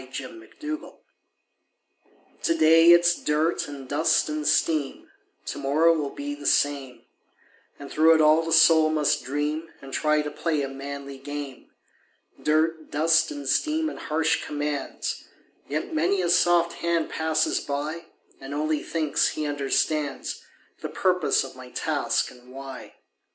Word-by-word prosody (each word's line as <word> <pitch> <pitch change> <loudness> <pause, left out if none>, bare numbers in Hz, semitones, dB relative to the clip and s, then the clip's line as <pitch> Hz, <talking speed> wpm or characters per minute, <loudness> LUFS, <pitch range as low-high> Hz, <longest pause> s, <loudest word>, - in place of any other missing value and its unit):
THE - - -13
WORKMAN'S 345 - -9
DREAM 310 +1 -5 1.5
To 165 - +1
day 165 +1 +6
it's 175 0 +4
dirt 155 +3 0
and 140 -2 -9
dust 155 +3 +2
and 150 -1 -3
steam, 150 -4 0 0.3
To - - -5
morrow 150 +4 +3
it - - -1
will 145 -2 -2
be 145 +1 -6
the 145 0 -6
same, 140 -3 0 0.7
And 140 -1 -10
through 160 +1 +5
it - - +2
all 155 +1 +5
the 165 0 -4
soul 160 -1 +6
must 150 -2 +1
dream 150 +4 -3
And 135 -1 -12
try 150 -1 +1
to 150 - -5
play 150 -1 -1
a - - -2
manly 140 0 -8
game; 145 -1 -7 0.7
Dirt, 155 +1 0
dust 160 +1 +3
and 145 -2 -7
steam 310 - +1
and - - -9
harsh 160 +1 0
commands, 145 -1 -4 0.4
Yet 155 +3 -4
many 180 +5 +1
a 175 - 0
soft 175 -1 +3
hand 170 -1 0
passes 160 0 0
by 150 +4 -4 0.3
And 135 +1 -7
only 155 0 -1
thinks 155 -3 0
he 155 - -3
understands 145 0 -1 0.4
The - - -4
purpose - - +1
of - - -10
my - - -11
task - - -1
and 125 0 -17
why. 135 0 -9
155 Hz, 150 wpm, -25 LUFS, 145-165 Hz, 1.5 s, day